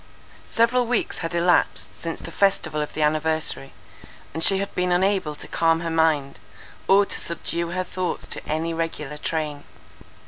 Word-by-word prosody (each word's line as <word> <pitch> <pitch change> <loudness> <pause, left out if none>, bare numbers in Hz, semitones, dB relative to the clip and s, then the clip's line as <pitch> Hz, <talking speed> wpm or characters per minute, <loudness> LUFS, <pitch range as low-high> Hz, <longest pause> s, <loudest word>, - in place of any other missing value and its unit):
Several 235 +2 +3
weeks 245 -1 0
had 165 0 -3
elapsed 175 +1 +2
since 165 -1 -5
the - - -8
festival 195 -6 +1
of 150 - -5
the 155 - +1
anniversary, 155 -2 0 0.6
and 160 - -1
she 195 - +5
had 200 +1 -3
been 180 0 0
unable 185 -4 +2
to - - -8
calm 165 0 +2
her 165 -1 -2
mind, 155 -4 +2 0.5
or 200 +1 +6
to - - -2
subdue 170 0 -2
her 185 +1 -1
thoughts 185 0 -3
to - - -4
any 160 +2 -1
regular 155 -3 -3
train. 150 -2 -3
165 Hz, 165 wpm, -24 LUFS, 155-185 Hz, 0.6 s, or